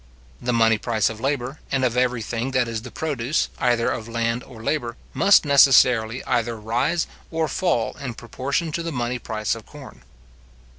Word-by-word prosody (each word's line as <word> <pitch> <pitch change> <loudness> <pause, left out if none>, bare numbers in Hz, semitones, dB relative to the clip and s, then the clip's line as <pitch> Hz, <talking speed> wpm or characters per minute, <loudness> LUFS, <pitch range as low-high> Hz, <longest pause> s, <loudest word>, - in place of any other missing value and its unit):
The 125 - -1
money 115 -2 +3
price 110 -1 +1
of 110 - -9
labour, 135 0 -2
and 135 -2 +1
of 120 -1 0
every 125 -2 +1
thing 120 +4 -3
that 125 -2 +2
is 115 -1 -3
the 125 - -9
produce, 145 -1 -1
either 120 -1 +2
of 110 - -4
land 115 +1 -1
or 115 -4 -12
labour, 120 -4 -2 0.2
must 195 -4 +5
necessarily 125 -4 +5
either 115 0 0
rise 120 +10 0 0.2
or 160 -1 -1
fall 170 - 0
in 125 -4 -5
proportion 140 +8 -3
to 170 - -2
the 165 0 -4
money 125 -2 -2
price 110 -2 -2
of 115 -2 -9
corn. 145 -2 -12
125 Hz, 180 wpm, -23 LUFS, 115-140 Hz, 0.2 s, must